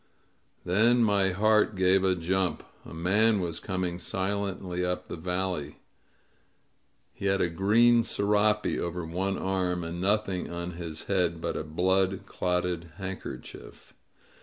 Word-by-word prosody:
Then 115 Hz, +6 st, +4 dB
my 100 Hz, -3 st, +3 dB
heart 105 Hz, +2 st, +3 dB
gave 95 Hz, 0 st, +3 dB
a 95 Hz, -1 st, +3 dB
jump. 90 Hz, -1 st, -1 dB, 0.2 s
A -, -, -11 dB
man 100 Hz, +6 st, +2 dB
was 85 Hz, -3 st, -3 dB
coining 90 Hz, -3 st, -3 dB
silently 95 Hz, 0 st, -2 dB
up 90 Hz, 0 st, -2 dB
the -, -, -5 dB
valley. 90 Hz, -2 st, -3 dB, 1.4 s
He -, -, -7 dB
had 95 Hz, 0 st, +2 dB
a 90 Hz, -, +2 dB
green 110 Hz, +7 st, +4 dB
serape 105 Hz, 0 st, +1 dB
over 85 Hz, 0 st, -3 dB
one 95 Hz, +4 st, -2 dB
arm, 90 Hz, -2 st, -1 dB
and 85 Hz, +1 st, -5 dB
nothing 100 Hz, -2 st, 0 dB
on 85 Hz, +1 st, -5 dB
his 85 Hz, -2 st, -6 dB
head 90 Hz, -4 st, 0 dB
but -, -, -3 dB
a -, -, -2 dB
blood 95 Hz, +4 st, +1 dB
clotted 90 Hz, -2 st, -2 dB
hand 95 Hz, -1 st, -5 dB
kerchief. -, -, -10 dB
95 Hz, 135 wpm, -28 LUFS, 85-100 Hz, 1.4 s, Then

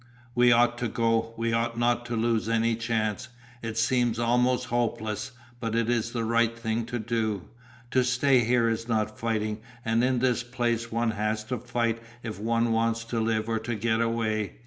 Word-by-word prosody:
"We 120 Hz, 0 st, +5 dB
ought 120 Hz, 0 st, +4 dB
to 120 Hz, -, 0 dB
go, 115 Hz, 0 st, 0 dB
we 115 Hz, 0 st, 0 dB
ought 115 Hz, 0 st, 0 dB
not 120 Hz, 0 st, +1 dB
to 120 Hz, -, -2 dB
lose 115 Hz, -1 st, +1 dB
any 115 Hz, 0 st, +2 dB
chance. 115 Hz, 0 st, -1 dB, 0.3 s
It 115 Hz, -1 st, -4 dB
seems 120 Hz, 0 st, +2 dB
almost 125 Hz, +2 st, +2 dB
hopeless, 110 Hz, -3 st, -1 dB, 0.3 s
but 115 Hz, -2 st, -2 dB
it 115 Hz, 0 st, +1 dB
is 120 Hz, -1 st, 0 dB
the 115 Hz, -1 st, -2 dB
right 115 Hz, 0 st, +2 dB
thing 115 Hz, 0 st, -2 dB
to 120 Hz, 0 st, -3 dB
do. 110 Hz, -4 st, -1 dB, 0.5 s
To 130 Hz, -, +3 dB
stay 125 Hz, +2 st, +3 dB
here 120 Hz, 0 st, +3 dB
is 115 Hz, 0 st, -1 dB
not 110 Hz, -2 st, -1 dB
fighting, 110 Hz, -2 st, -1 dB, 0.3 s
and 115 Hz, +1 st, +2 dB
in 130 Hz, 0 st, +2 dB
this 125 Hz, -1 st, +2 dB
place 120 Hz, -1 st, -2 dB
one 115 Hz, 0 st, +1 dB
has 110 Hz, 0 st, -1 dB
to 120 Hz, +2 st, -3 dB
fight 115 Hz, -1 st, -1 dB, 0.2 s
if 110 Hz, -3 st, -5 dB
one 115 Hz, +2 st, +1 dB
wants 115 Hz, 0 st, +1 dB
to 115 Hz, 0 st, -3 dB
live 110 Hz, -1 st, 0 dB
or 115 Hz, -1 st, 0 dB
to 115 Hz, +1 st, -3 dB
get 110 Hz, +1 st, +1 dB
away. 110 Hz, -, 0 dB
115 Hz, 190 wpm, -27 LUFS, 110-120 Hz, 0.5 s, We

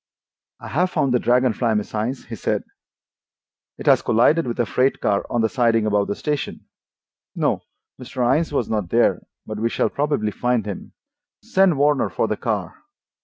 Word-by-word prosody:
"I -, -, -9 dB
have 180 Hz, +6 st, +1 dB
found 135 Hz, -7 st, 0 dB
the 125 Hz, -, +3 dB
Dragon 125 Hz, 0 st, +2 dB
Fly, 115 Hz, 0 st, 0 dB
Miss 105 Hz, -, -3 dB
Innes," 115 Hz, +5 st, -3 dB
he 115 Hz, -, -7 dB
said. -, -, -1 dB, 1.1 s
"It -, -, -9 dB
has -, -, +5 dB
collided 145 Hz, +7 st, +3 dB
with 120 Hz, -, -4 dB
a 120 Hz, -, +2 dB
freight 130 Hz, +4 st, +1 dB
car 100 Hz, -1 st, 0 dB
on 120 Hz, -, 0 dB
the 110 Hz, -, +3 dB
siding 115 Hz, -4 st, +2 dB
above 105 Hz, -1 st, +1 dB
the 100 Hz, -, -2 dB
station. 150 Hz, -2 st, -3 dB, 0.7 s
No, -, -, 0 dB, 0.4 s
Mr. 125 Hz, 0 st, 0 dB
Innes 160 Hz, +1 st, 0 dB
was 130 Hz, -6 st, 0 dB
not 105 Hz, -6 st, -2 dB
there, 120 Hz, +4 st, +2 dB, 0.2 s
but 110 Hz, -1 st, -6 dB
we 115 Hz, +1 st, +1 dB
shall -, -, 0 dB
probably 145 Hz, -7 st, -1 dB
find 125 Hz, -1 st, 0 dB
him. 100 Hz, -2 st, -7 dB, 0.5 s
Send 190 Hz, -5 st, +3 dB
Warner 145 Hz, 0 st, +2 dB
for -, -, -1 dB
the -, -, -1 dB
car." -, -, -3 dB
120 Hz, 180 wpm, -22 LUFS, 110-140 Hz, 1.1 s, has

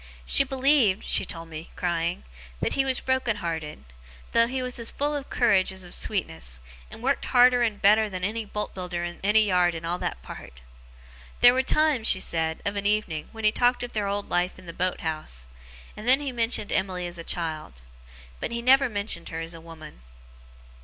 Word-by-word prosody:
She -, -, +6 dB
believed 265 Hz, -6 st, +2 dB
(she -, -, 0 dB
told 165 Hz, -1 st, -6 dB
me, 160 Hz, 0 st, -8 dB
crying) 170 Hz, 0 st, -1 dB, 0.4 s
that -, -, 0 dB
he 275 Hz, -, +2 dB
was 260 Hz, -1 st, +1 dB
broken 260 Hz, -4 st, 0 dB
hearted; 160 Hz, -, -5 dB, 0.5 s
though 230 Hz, 0 st, +4 dB
he 255 Hz, +1 st, -2 dB
was 250 Hz, -1 st, -2 dB
as 230 Hz, -, -2 dB
full 295 Hz, +1 st, -1 dB
of 280 Hz, -1 st, -5 dB
courage 205 Hz, -7 st, +3 dB
as 190 Hz, 0 st, -6 dB
of 175 Hz, -, -6 dB
sweetness, 80 Hz, -, -2 dB, 0.3 s
and 225 Hz, -, -11 dB
worked 275 Hz, +2 st, +1 dB
harder 245 Hz, -1 st, +5 dB
and 220 Hz, -3 st, 0 dB
better 215 Hz, +2 st, +4 dB
than 185 Hz, -2 st, -5 dB
any 220 Hz, +4 st, -1 dB
boat 210 Hz, 0 st, -5 dB
builder 180 Hz, -2 st, -4 dB
in 175 Hz, 0 st, -5 dB
any 210 Hz, +2 st, +5 dB
yard 180 Hz, -3 st, +2 dB
in 165 Hz, 0 st, -6 dB
all 175 Hz, +2 st, -2 dB
that -, -, -4 dB
part. -, -, -11 dB, 0.8 s
There 245 Hz, 0 st, +9 dB
were 260 Hz, -, +2 dB
times, 290 Hz, -3 st, +2 dB
she 185 Hz, -, +5 dB
said, 160 Hz, -3 st, -1 dB
of 200 Hz, 0 st, -1 dB
an 200 Hz, 0 st, 0 dB
evening, 205 Hz, -8 st, -1 dB
when 225 Hz, 0 st, -9 dB
he 215 Hz, -, +5 dB
talked 245 Hz, +2 st, +2 dB
of 245 Hz, -, -6 dB
their 210 Hz, -2 st, -1 dB
old 200 Hz, 0 st, -2 dB
life 180 Hz, +1 st, 0 dB
in 185 Hz, -, -14 dB
the 170 Hz, -, -7 dB
boat 185 Hz, +1 st, -2 dB
house; 155 Hz, -, -4 dB, 0.5 s
and 215 Hz, -, -8 dB
then 260 Hz, +2 st, +6 dB
he 285 Hz, -2 st, -3 dB
mentioned 230 Hz, -3 st, -1 dB
Emily 185 Hz, -2 st, -1 dB
as 175 Hz, -1 st, -5 dB
a -, -, -6 dB
child. 155 Hz, -, -4 dB, 0.6 s
But, -, -, -4 dB
he 235 Hz, 0 st, -3 dB
never 265 Hz, +1 st, +5 dB
mentioned 200 Hz, -5 st, -3 dB
her 165 Hz, 0 st, -4 dB
as 165 Hz, +1 st, -3 dB
a 165 Hz, -, -10 dB
woman. 160 Hz, -, -12 dB
200 Hz, 205 wpm, -26 LUFS, 170-245 Hz, 0.8 s, There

